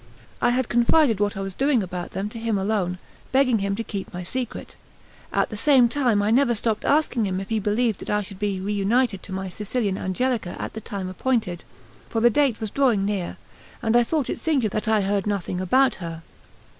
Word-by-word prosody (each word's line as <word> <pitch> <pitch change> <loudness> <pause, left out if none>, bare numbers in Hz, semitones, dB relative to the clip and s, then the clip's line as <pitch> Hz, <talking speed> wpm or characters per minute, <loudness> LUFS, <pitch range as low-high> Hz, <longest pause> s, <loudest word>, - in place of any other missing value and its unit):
I 240 - +4
had 250 0 +1
confided 240 -1 +3
what 205 -1 0
I - - -3
was 195 -1 -4
doing 270 -1 +2
about 180 -1 -5
them 195 +2 -3
to 230 - -8
him 225 -2 0
alone, 190 -2 0 0.3
begging 260 -4 +3
him 200 0 -1
to 230 - -3
keep 200 -3 -6
my 180 0 -6
secret. 245 +6 -5 0.6
At - - +1
the - - -4
same 250 +2 +5
time 235 -5 +1
I 210 - +1
never 240 0 +4
stopped 215 0 -1
asking 280 -7 +2
him 185 -1 -2
if 195 - -7
he 220 -1 +1
believed 215 +1 0
that - - -8
I 210 0 +1
should 195 -1 -10
be 205 -2 -1
reunited 205 +2 +1
to - - -11
my 190 0 -3
Sicilian 205 +1 -2
Angelica 215 0 -1
at - - -5
the 220 - -6
time 195 -2 -5
appointed; 185 -3 -1 0.5
for 225 - -1
the 240 +1 +5
date 265 -2 +2
was 220 -2 -4
drawing 240 -8 +2
near, 200 -4 -2 0.5
and 225 +1 +2
I 240 - +7
thought 285 +3 0
it - - -3
singular 275 -9 +1
that 215 +1 -2
I 220 -1 +3
heard 200 +1 0
nothing 190 -3 -2
about 260 +8 +3
her. 165 -1 -6
215 Hz, 215 wpm, -24 LUFS, 195-240 Hz, 0.6 s, I